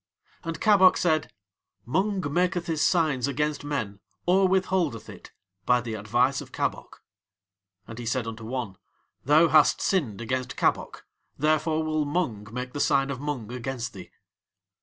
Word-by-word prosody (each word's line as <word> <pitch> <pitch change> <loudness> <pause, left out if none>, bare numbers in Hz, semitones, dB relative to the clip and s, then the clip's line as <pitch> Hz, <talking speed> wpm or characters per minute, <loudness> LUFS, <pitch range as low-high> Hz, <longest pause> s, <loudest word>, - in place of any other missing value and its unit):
And 165 -1 -5
Kabok 195 -4 +5
said: 155 -3 +1 0.5
"Mung 190 - 0
maketh 175 0 +1
his 160 -3 -2
signs 150 -7 +2
against 150 +1 -1
men 125 -9 -3 0.3
or 190 +2 +4
withholdeth 185 - 0
it - - -12 0.4
by 125 0 +4
the 115 -2 -5
advice 120 +6 +1
of - - -12
Kabok." - - -4 0.8
And 115 +1 -9
he 120 - -6
said 125 0 -1
unto 115 0 -7
one: 115 -5 -4 0.5
"Thou 155 +4 +5
hast 155 -1 +5
sinned 140 - 0
against 125 +2 -3
Kabok, - - -1 0.3
therefore 155 +1 +1
will 155 -1 0
Mung 140 - -2
make 125 +1 -5
the 145 - -4
sign 140 -1 +2
of 130 - -5
Mung 135 -7 -4
against 125 -1 -4
thee." 95 -2 -10
140 Hz, 150 wpm, -26 LUFS, 120-165 Hz, 0.8 s, Kabok